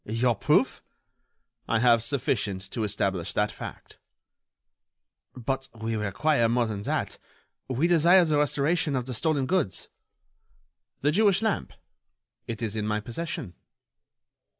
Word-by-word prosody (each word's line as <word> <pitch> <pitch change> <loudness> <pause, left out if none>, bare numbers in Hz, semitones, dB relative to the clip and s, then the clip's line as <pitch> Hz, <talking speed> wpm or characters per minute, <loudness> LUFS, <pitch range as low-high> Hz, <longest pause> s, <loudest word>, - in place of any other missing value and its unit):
"Your 115 +3 +1
proof?" - - +2 0.9
"I 115 - +2
have 115 0 +4
sufficient 105 -6 -1
to 115 - -2
establish 100 -4 -1
that 105 0 +1
fact." - - -10 1.4
"But 135 +2 -3
we 110 0 -2
require 115 +5 +1
more 120 +1 +2
than 105 -3 -4
that. - - -2 0.5
We 130 +6 +1
desire 175 +2 +5
the 150 -2 +2
restoration 150 +2 +1
of 125 -2 -1
the 130 - -4
stolen 145 +2 +1
goods." 130 - -1 1.1
"The 145 - +3
Jewish 205 +3 +3
lamp? 220 -2 -1 0.8
It 115 0 -5
is 110 -2 -2
in 105 -1 -2
my 105 0 0
possession." 120 - -5
120 Hz, 125 wpm, -27 LUFS, 105-150 Hz, 1.4 s, desire